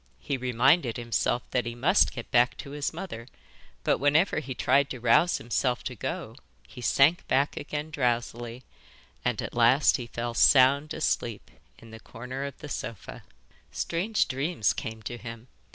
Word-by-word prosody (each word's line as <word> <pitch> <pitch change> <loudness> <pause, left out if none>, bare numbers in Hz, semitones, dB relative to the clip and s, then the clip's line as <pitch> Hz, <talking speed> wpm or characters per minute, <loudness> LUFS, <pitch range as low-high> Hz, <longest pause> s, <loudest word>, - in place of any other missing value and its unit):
He 135 - -3
reminded 130 +2 +2
himself 120 0 -1
that 125 -2 0
he 120 - -5
must 150 +12 +3
get 120 - -8
back 120 0 +3
to 140 - -8
his 145 0 -2
mother, 160 -9 -7 0.6
but - - +1
whenever 150 +6 +3
he 135 -4 -6
tried 135 +3 +2
to 125 - -6
rouse 125 +9 +3
himself 125 +2 -1
to 130 - -4
go - - -5 0.3
he 125 - -11
sank 140 +8 +3
back 140 +2 +1
again 150 +1 -5
drowsily, 120 -2 -2 0.6
and - - -1
at - - -6
last 120 +6 +4
he 120 -3 -7
fell 120 0 -4
sound 140 +4 +5
asleep - - -2 0.3
in 115 -1 -15
the 110 - -10
corner 125 +5 -7
of 140 - -7
the 150 - -9
sofa. 115 -6 -7 0.5
Strange 195 +6 -1
dreams 135 - 0
came 110 -1 -6
to 120 +3 -6
him. 115 +1 -9
125 Hz, 165 wpm, -27 LUFS, 120-145 Hz, 0.6 s, sound